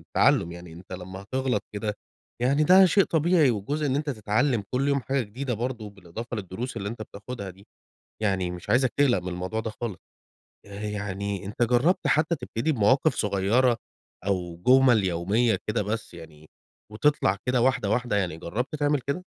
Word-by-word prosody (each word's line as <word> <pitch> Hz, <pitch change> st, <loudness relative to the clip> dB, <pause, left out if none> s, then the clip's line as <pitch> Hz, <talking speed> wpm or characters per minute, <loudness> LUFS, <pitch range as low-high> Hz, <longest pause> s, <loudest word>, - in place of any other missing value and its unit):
التعلّم، 85 Hz, -, +2 dB
يعني 85 Hz, -1 st, -10 dB
أنت 90 Hz, +3 st, -12 dB
لمّا 95 Hz, +1 st, -7 dB
هتغلط 130 Hz, 0 st, -1 dB
كده 105 Hz, 0 st, -3 dB, 0.5 s
يعني 140 Hz, +4 st, +3 dB
ده 190 Hz, +3 st, +8 dB
شيء 195 Hz, +3 st, +4 dB
طبيعي، 160 Hz, -2 st, +3 dB
وجزء 140 Hz, +8 st, -2 dB
إن 135 Hz, -1 st, +1 dB
أنت 145 Hz, 0 st, -1 dB
تتعلّم 110 Hz, +1 st, 0 dB
كل 135 Hz, +2 st, 0 dB
يوم 140 Hz, -1 st, +2 dB
حاجة 135 Hz, +3 st, -1 dB
جديدة 120 Hz, +4 st, -4 dB
برضو 115 Hz, -1 st, -4 dB
بالإضافة 100 Hz, +5 st, -7 dB
للدروس 110 Hz, +5 st, -5 dB
اللي 100 Hz, -1 st, -3 dB
أنت 110 Hz, 0 st, -6 dB
بتاخدها 100 Hz, 0 st, -7 dB
دي، 95 Hz, +2 st, -17 dB, 0.6 s
يعني 95 Hz, -4 st, 0 dB
مش 90 Hz, +3 st, -7 dB
عايزك 125 Hz, +1 st, +4 dB
تقلق 135 Hz, -7 st, +4 dB
من 90 Hz, +1 st, -5 dB
الموضوع 90 Hz, +5 st, -3 dB
ده 110 Hz, 0 st, -4 dB
خالص. 115 Hz, -6 st, -4 dB, 0.7 s
آآ 100 Hz, 0 st, -9 dB
يعني 100 Hz, -1 st, -3 dB
أنت 105 Hz, +4 st, -1 dB
جرّبت 125 Hz, +10 st, +2 dB
حتّى 155 Hz, +2 st, +2 dB
تبتدي 140 Hz, 0 st, -2 dB
بمواقف 130 Hz, +5 st, +3 dB
صغيّرة 105 Hz, +5 st, +2 dB, 0.5 s
أو 90 Hz, -3 st, -1 dB
جُمَل 125 Hz, -4 st, +6 dB
يوميّة 95 Hz, +5 st, +1 dB
كده 105 Hz, -, 0 dB
بس 110 Hz, 0 st, -4 dB
يعني، 80 Hz, -2 st, -13 dB, 0.4 s
وتطلَع 105 Hz, -4 st, +2 dB
كده 125 Hz, -1 st, +2 dB
واحدة 125 Hz, -5 st, +2 dB
واحدة، 120 Hz, 0 st, 0 dB
يعني 90 Hz, -5 st, -1 dB
جرّبت 115 Hz, -, -3 dB
تعمل 145 Hz, -1 st, +1 dB
كده؟ 140 Hz, +3 st, -2 dB
110 Hz, 170 wpm, -26 LUFS, 100-130 Hz, 0.7 s, ده